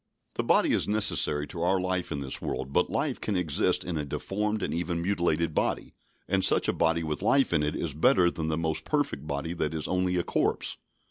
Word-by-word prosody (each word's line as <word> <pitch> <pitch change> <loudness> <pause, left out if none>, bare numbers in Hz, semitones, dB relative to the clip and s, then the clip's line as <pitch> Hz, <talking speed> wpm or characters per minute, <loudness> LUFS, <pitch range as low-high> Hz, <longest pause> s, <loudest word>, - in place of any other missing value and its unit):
The - - -2
body - - +3
is - - +1
necessary 100 -8 +2
to 85 - -6
our 95 +2 +2
life 90 -1 -2
in 70 - -3
this 65 -1 -3
world, 65 +1 -4
but 90 - +2
life 140 -3 -1
can 105 - -1
exist 85 -6 +2
in 85 -3 -3
a - - -2
deformed 105 +8 -2
and - - -2
even 85 0 -2
mutilated 85 -3 0
body; - - -1 0.3
and 95 0 +1
such - - +4
a - - +1
body 85 0 +1
with 75 -1 -3
life 135 -8 +3
in 80 - +3
it 75 0 -1
is 80 -4 -3
better 85 +3 +3
than 80 -1 -4
the 80 -1 -1
most 80 -1 -1
perfect 145 - -2
body 70 +3 -3
that 80 -2 -2
is 80 - -2
only 90 0 0
a 90 - +1
corpse. - - -1
85 Hz, 220 wpm, -28 LUFS, 75-95 Hz, 0.3 s, such